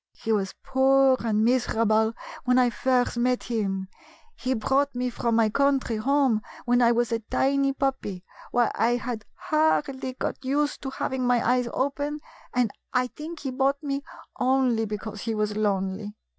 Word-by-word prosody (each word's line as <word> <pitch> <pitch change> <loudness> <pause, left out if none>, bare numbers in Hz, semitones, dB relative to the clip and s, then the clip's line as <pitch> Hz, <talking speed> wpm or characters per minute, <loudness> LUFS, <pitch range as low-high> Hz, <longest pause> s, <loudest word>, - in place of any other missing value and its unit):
He 225 - -4
was 195 -3 0
poor 265 0 +4
and 220 -1 +1
miserable 225 -3 +2 0.3
when 250 -1 +3
I 250 -1 +4
first 250 0 +1
met 250 +1 +1
him. 195 -5 -2 0.5
He 260 0 -1
brought 270 +4 +1
me 250 0 -1
from 235 -1 0
my 225 -1 +4
country 270 -2 +1
home 265 -1 +2 0.2
when 245 0 +3
I 235 -1 +5
was 240 0 +1
a 230 - +1
tiny 275 +5 +1
puppy; 265 -9 -2 0.3
why, 240 -1 +2
I 235 +2 +2
had 240 -3 -4
hardly 295 -5 0
got 260 - -4
used 290 +3 0
to 270 - -4
having 260 -1 -2
my 245 -2 +2
eyes 250 0 +2
open, 285 +2 -2 0.3
and 245 -4 +1 0.2
I 250 0 +1
think 315 +2 -7
he 270 - -3
bought 275 +3 0
me 280 -1 -2 0.4
only 255 -3 +2
because 210 0 -6
he 225 -1 -2
was 210 -1 -1
lonely. 205 0 -1
250 Hz, 165 wpm, -26 LUFS, 220-270 Hz, 0.5 s, I